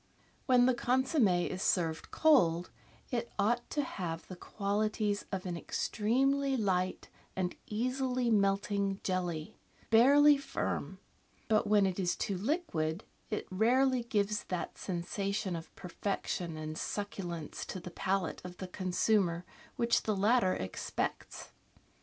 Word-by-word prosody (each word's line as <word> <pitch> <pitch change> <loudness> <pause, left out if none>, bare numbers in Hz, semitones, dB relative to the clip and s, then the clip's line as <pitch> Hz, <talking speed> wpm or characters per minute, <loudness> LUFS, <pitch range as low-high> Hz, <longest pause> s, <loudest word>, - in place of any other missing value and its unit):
When 250 -2 +6
the 255 - +4
consomm^ 245 - +2
is 185 - -4
served 165 -5 0
cold 175 - +3 0.4
it 235 -1 -2
ought 235 +4 +1
to 295 - 0
have 170 -9 -4
the 185 - -8
qualities 205 +2 -1
of 190 -1 -3
an 180 -2 -3
extremely 270 +10 +1
light 185 -4 0 0.3
and 180 -1 -1
easily 250 +2 0
melting 200 -1 +1
jelly, 180 0 -2 0.3
barely 285 +6 +7
firm; 275 - -3 0.5
but 215 -1 +2
when 205 -1 +5
it 190 0 -1
is 175 -2 +1
too 200 - -2
liquid, 185 - -1 0.3
it 210 - -2
rarely 250 +6 +3
gives 210 -3 -1
that 180 -2 -4
sensation 190 +1 -2
of 165 0 -7
perfection 180 -2 -3
and 155 +1 -5
succulence 175 -6 -4
to 185 - -5
the 180 0 -9
palate 190 +2 -1
of 180 0 -8
the 185 - -6
consumer 180 -1 +1 0.3
which 235 0 +2
the 215 - -1
latter 205 -1 +3
expects. 95 0 -4
200 Hz, 130 wpm, -32 LUFS, 180-235 Hz, 0.5 s, barely